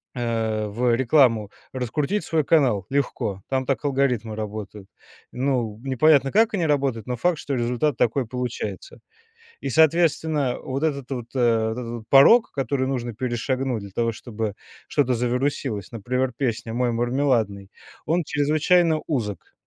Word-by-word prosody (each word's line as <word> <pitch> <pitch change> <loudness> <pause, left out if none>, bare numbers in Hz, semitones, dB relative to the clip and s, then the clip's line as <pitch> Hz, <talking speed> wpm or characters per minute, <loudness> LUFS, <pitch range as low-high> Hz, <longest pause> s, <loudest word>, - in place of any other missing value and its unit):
а, 110 -3 -1
в 120 +3 +1
рекламу, 120 -5 +3 0.2
раскрутить 140 - -1
свой 160 -1 0
канал. 130 - +2
Легко. 125 -8 -1
Там 130 -1 0
так 130 -3 -1
алгоритмы 125 -6 0
работают. 105 -2 -6 0.4
Ну, 125 -5 -1
непонятно, 135 +1 +3
как 220 +1 +3
они 175 -5 0
работают, 135 -7 0
но 125 - -2
факт, 175 +4 +1
что 140 - -3
результат 125 +3 0
такой 120 +2 +1
получается. 125 - -5 0.6
И, - - -3
соответственно, 160 -4 +2
вот 135 +2 -4
этот 140 -4 -2
вот, 125 -3 -3
а, 115 -3 +2
вот 110 - -4
этот 115 -2 -5
вот 120 -1 -6
порог, 180 - +6
который 130 0 -1
нужно 120 -3 -3
перешагнуть 125 +1 -2
для 100 - -10
того, 115 +4 0
чтобы 110 -2 -5 0.3
что-то 130 -3 +1
завирусилось, 125 -3 -2
например, 125 +3 -2
песня 115 -3 -2
"Мой 125 0 0
мармеладный", 120 -5 0 0.4
он 165 +2 +1
чрезвычайно 155 +3 +2
узок. 110 - -3
125 Hz, 145 wpm, -23 LUFS, 115-140 Hz, 0.6 s, порог